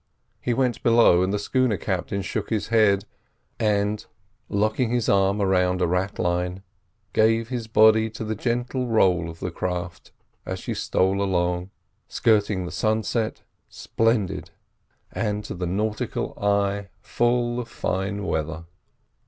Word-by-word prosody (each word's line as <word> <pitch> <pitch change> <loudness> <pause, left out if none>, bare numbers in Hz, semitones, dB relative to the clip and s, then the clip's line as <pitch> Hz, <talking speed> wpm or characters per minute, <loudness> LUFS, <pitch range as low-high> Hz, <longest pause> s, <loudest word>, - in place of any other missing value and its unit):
He 125 - -1
went 125 -1 0
below, 115 -7 +5
and 95 +1 +1
the 105 - 0
schooner 120 +1 +1
captain 95 +2 -2
shook - - -3
his 110 -2 -1
head, 105 -3 +3 0.5
and, 105 -1 +1 0.5
locking 110 +4 +1
his 120 -1 0
arm 100 +1 +3
round 90 -2 +2
a 90 - +2
ratlin, 90 0 -1 0.5
gave 115 +1 +3
his 120 -3 -4
body 110 0 +5
to 110 0 -7
the 110 0 -2
gentle 120 +3 -2
roll 90 -7 +2
of 85 0 -10
the 90 - -3
craft 90 -1 -4 0.3
as - - -4
she - - -4
stole 95 +1 +1
along, 90 -1 0 0.4
skirting 105 -4 +1
the 90 - -6
sunset, 110 +3 -1 0.3
splendid, 115 -3 -1 0.6
and 105 -1 -2
to - - -6
the 90 0 -3
nautical 105 +4 -2
eye 100 0 +1
full 120 0 0
of 120 -1 -5
fine 100 +2 -2
weather. 80 0 -3
100 Hz, 135 wpm, -24 LUFS, 90-110 Hz, 0.6 s, below